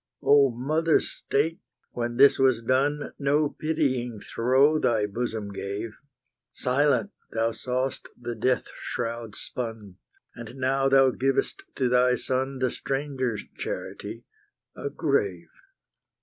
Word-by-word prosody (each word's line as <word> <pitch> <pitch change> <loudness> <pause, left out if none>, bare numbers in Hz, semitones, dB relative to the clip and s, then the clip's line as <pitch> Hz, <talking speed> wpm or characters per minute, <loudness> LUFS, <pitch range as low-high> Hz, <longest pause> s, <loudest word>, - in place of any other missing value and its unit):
O 140 -1 +6
Mother 155 +7 +2
State! 160 +6 -1 0.3
when 120 0 -3
this 140 +1 +6
was 130 -3 +3
done, 140 +4 +1
No 145 +1 +2
pitying 130 -9 -1
throe 130 +9 +3
thy 110 -7 +2
bosom 110 -1 -3
gave; 100 +3 -4 0.6
Silent 145 +8 +2 0.2
thou 115 0 +1
saw'st 130 +3 -3
the 120 0 -4
death 125 +3 0
shroud 115 -2 -4
spun, 110 -6 -6 0.4
And 115 +1 -9
now 135 +1 +1
thou 135 -1 +5
givest 135 +2 -1
to 130 - +1
thy 125 0 +4
son 130 +2 -1
The 130 -2 0
stranger's 135 -5 -2
charity - - -6 0.5
a 140 - -4
grave. 105 - -1
130 Hz, 120 wpm, -26 LUFS, 115-140 Hz, 0.6 s, O